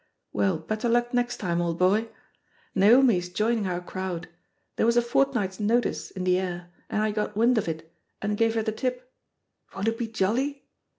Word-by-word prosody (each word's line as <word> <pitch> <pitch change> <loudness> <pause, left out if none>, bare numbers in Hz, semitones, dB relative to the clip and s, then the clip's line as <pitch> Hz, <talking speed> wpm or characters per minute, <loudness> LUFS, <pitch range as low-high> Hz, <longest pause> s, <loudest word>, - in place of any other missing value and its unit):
Well, 190 -4 +1
bet 215 +8 -4
ter 240 - 0
luck 240 +1 +1
next 245 0 0
time, 175 -1 -1
old 170 -1 -1
boy! 205 +5 +2 0.6
Naomi 230 +3 +6
is 180 0 -4
joining 215 +2 0
our 180 -1 -2
crowd. 180 -1 -5 0.5
There - - +2
was 235 +1 +3
a - - +6
fortnight's 235 -6 0
notice 230 +4 0
in 185 - -6
the 180 0 +3
air^ 175 -1 -4 0.2
and 215 - 0
I 215 - +1
got 210 0 -3
wind 235 +1 +4
of 200 - -4
it, 160 0 -5 0.3
and 210 +1 -1
gave 225 +1 +2
her 225 - +1
the 220 - -1
tip. 250 +3 -4 0.6
Won't 200 +3 0
it 225 - -4
be 235 - -1
jolly? 235 +7 -1
215 Hz, 195 wpm, -26 LUFS, 185-235 Hz, 0.6 s, Naomi